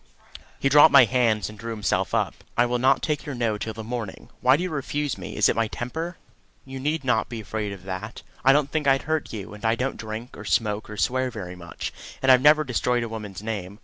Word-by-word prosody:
He -, -, +1 dB
dropped 145 Hz, +2 st, +7 dB
my 135 Hz, -3 st, +8 dB
hands 115 Hz, -3 st, +1 dB
and 105 Hz, -1 st, -11 dB
drew 115 Hz, +1 st, -6 dB
himself 105 Hz, -3 st, -1 dB
up. -, -, +1 dB, 0.2 s
"I 120 Hz, -, +5 dB
will 120 Hz, 0 st, -1 dB
not 130 Hz, +2 st, +3 dB
take 150 Hz, -2 st, -1 dB
your 145 Hz, -3 st, -5 dB
No 115 Hz, -3 st, -1 dB
till 110 Hz, 0 st, -4 dB
the 110 Hz, -, -6 dB
morning. 115 Hz, -3 st, -6 dB
Why 130 Hz, +2 st, +5 dB
do 175 Hz, -, -2 dB
you 185 Hz, -, -3 dB
refuse 145 Hz, -2 st, -2 dB
me? -, -, -8 dB
Is -, -, +5 dB
it -, -, +1 dB
my 115 Hz, -1 st, +1 dB
temper? 160 Hz, +11 st, -5 dB, 0.5 s
You 135 Hz, 0 st, -7 dB
need 150 Hz, +2 st, -1 dB
not 120 Hz, -4 st, +1 dB
be 120 Hz, -1 st, -5 dB
afraid 105 Hz, -1 st, -4 dB
of 95 Hz, -2 st, -9 dB
that. 95 Hz, -1 st, -6 dB, 0.2 s
I 135 Hz, -, +7 dB
don't 140 Hz, 0 st, +2 dB
think 155 Hz, -3 st, -1 dB
I'd 135 Hz, 0 st, +4 dB
hurt 155 Hz, 0 st, -2 dB
you; 105 Hz, -2 st, -7 dB
and 105 Hz, -, -12 dB
I 110 Hz, 0 st, +3 dB
don't 130 Hz, +3 st, -2 dB
drink, 110 Hz, +3 st, -7 dB
or -, -, -9 dB
smoke, 105 Hz, 0 st, 0 dB
or 105 Hz, -, -7 dB
swear 130 Hz, +5 st, +1 dB
very 90 Hz, -6 st, -7 dB
much; 85 Hz, -1 st, -7 dB, 0.3 s
and 130 Hz, -, +4 dB
I've 130 Hz, -1 st, +6 dB
never 150 Hz, +2 st, +6 dB
destroyed 125 Hz, -2 st, 0 dB
a 115 Hz, -, -4 dB
woman's 105 Hz, -3 st, -7 dB
name. 100 Hz, -3 st, -5 dB
120 Hz, 245 wpm, -25 LUFS, 110-135 Hz, 0.5 s, my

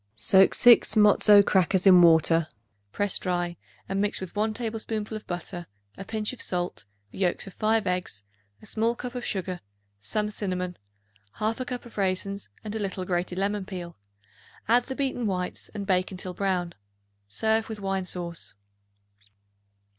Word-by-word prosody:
Soak 190 Hz, -, +4 dB
6 240 Hz, -2 st, +6 dB
matzoth 210 Hz, -1 st, +6 dB
crackers 190 Hz, 0 st, +2 dB
in 185 Hz, -2 st, +8 dB
water; 165 Hz, -1 st, +5 dB, 0.4 s
press 205 Hz, -, 0 dB
dry 175 Hz, -1 st, -2 dB, 0.3 s
and 195 Hz, +1 st, -1 dB
mix 205 Hz, 0 st, 0 dB
with 185 Hz, 0 st, -8 dB
1 215 Hz, +1 st, +1 dB
tablespoonful 220 Hz, -1 st, -3 dB
of 215 Hz, -, -8 dB
butter, 175 Hz, 0 st, -5 dB, 0.3 s
a 195 Hz, -, -7 dB
pinch 215 Hz, +3 st, -2 dB
of 255 Hz, -, -8 dB
salt, 180 Hz, -, -1 dB, 0.3 s
the -, -, -10 dB
yolks 180 Hz, -3 st, +1 dB
of 195 Hz, -, -10 dB
5 220 Hz, 0 st, +1 dB
eggs, 180 Hz, -, -2 dB, 0.4 s
a -, -, -11 dB
small 230 Hz, +2 st, 0 dB
cup 250 Hz, +1 st, -6 dB
of 245 Hz, -1 st, -5 dB
sugar, 185 Hz, -2 st, -3 dB, 0.4 s
some 210 Hz, -, -1 dB
cinnamon, 180 Hz, -3 st, -3 dB, 0.6 s
1/2 225 Hz, +4 st, -2 dB
cup 250 Hz, -1 st, -5 dB
of 230 Hz, -3 st, -9 dB
raisins 195 Hz, +1 st, -1 dB
and 215 Hz, -1 st, -5 dB
a 220 Hz, -, -3 dB
little 190 Hz, -2 st, -3 dB
grated 180 Hz, 0 st, -2 dB
lemon 200 Hz, +1 st, 0 dB
peel. 180 Hz, -3 st, -7 dB, 0.7 s
Add 240 Hz, +2 st, +4 dB
the 265 Hz, -, -5 dB
beaten 260 Hz, -4 st, -1 dB
whites 180 Hz, -2 st, -3 dB
and 200 Hz, -1 st, -4 dB
bake 185 Hz, -2 st, +1 dB
until 185 Hz, -1 st, -6 dB
brown. 180 Hz, -3 st, -1 dB, 0.5 s
Serve 220 Hz, -, 0 dB
with 220 Hz, -1 st, -5 dB
wine 195 Hz, -1 st, -2 dB
sauce. 170 Hz, -, -4 dB
195 Hz, 160 wpm, -26 LUFS, 180-215 Hz, 0.7 s, in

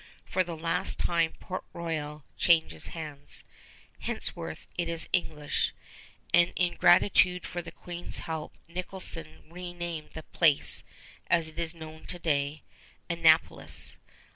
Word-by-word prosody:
For 185 Hz, -, +2 dB
the 170 Hz, -2 st, -5 dB
last 165 Hz, +1 st, 0 dB
time 170 Hz, -2 st, +2 dB
Port 185 Hz, -, -4 dB
Royal 155 Hz, -3 st, -3 dB
changes 160 Hz, -, +3 dB
hands. 150 Hz, -3 st, -6 dB, 0.6 s
Henceforth -, -, -3 dB
it 170 Hz, -1 st, -1 dB
is 165 Hz, 0 st, +2 dB
English, 150 Hz, -5 st, +1 dB, 0.6 s
and 175 Hz, 0 st, +6 dB
in 180 Hz, -1 st, +2 dB
gratitude 180 Hz, 0 st, +5 dB
for 175 Hz, -1 st, -3 dB
the 170 Hz, -1 st, -9 dB
Queen's 175 Hz, 0 st, -4 dB
help 160 Hz, -2 st, -4 dB
Nicholson 170 Hz, -2 st, -4 dB
renamed 175 Hz, -2 st, -5 dB
the 160 Hz, -, -6 dB
place 155 Hz, -4 st, +3 dB, 0.4 s
as 165 Hz, -2 st, +3 dB
it 160 Hz, +1 st, -9 dB
is 165 Hz, 0 st, -1 dB
known 160 Hz, -1 st, -9 dB
to 175 Hz, -, -1 dB
day, 145 Hz, -2 st, 0 dB, 0.5 s
Annapolis. 165 Hz, -1 st, +3 dB
165 Hz, 125 wpm, -30 LUFS, 155-175 Hz, 0.6 s, and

